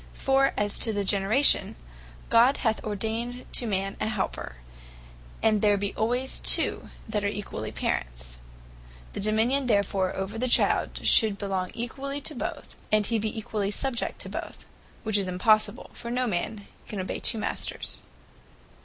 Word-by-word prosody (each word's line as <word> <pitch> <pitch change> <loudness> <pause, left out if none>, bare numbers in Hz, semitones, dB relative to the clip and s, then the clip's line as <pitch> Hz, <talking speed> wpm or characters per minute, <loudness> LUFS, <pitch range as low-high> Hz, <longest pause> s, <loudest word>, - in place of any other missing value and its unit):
For 270 0 +2
as 205 0 0
to 225 - +3
the 205 -1 0
Generation, 200 +8 +3 0.6
God 240 +4 +5
hath 220 -1 +1
ordained 225 +4 -3
to 240 - 0
man 195 -1 -2
a - - +1
helper; 210 - -3 0.9
and 215 -2 +3
there 205 -1 +4
be 200 0 -2
alwayes 245 +4 0
two - - +3 0.2
that 210 -2 -1
are - - +1
equally 200 - -4
Parents: - - -3 0.7
the - - -5
Dominion 225 +6 +1
therefore 200 -4 +1
over 195 +3 -4
the 255 - 0
Child, 240 - +2
should 215 -4 +5
belong 190 -2 -2
equally 270 +4 -4
to 285 - -3
both; - - -5 0.2
and 215 -1 +4
he 225 +1 +1
be 220 +2 -3
equally 210 -2 -2
subject 240 +3 -2
to - - -2
both, - - -7 0.4
which 215 -2 +2
is 195 - -1
impossible; 215 +4 +2
for 235 - -8
no 250 +1 0
man 205 0 -3 0.2
can 205 - -5
obey 185 - -3
two 230 - +2
Masters. 215 - -3
215 Hz, 155 wpm, -27 LUFS, 200-235 Hz, 0.9 s, God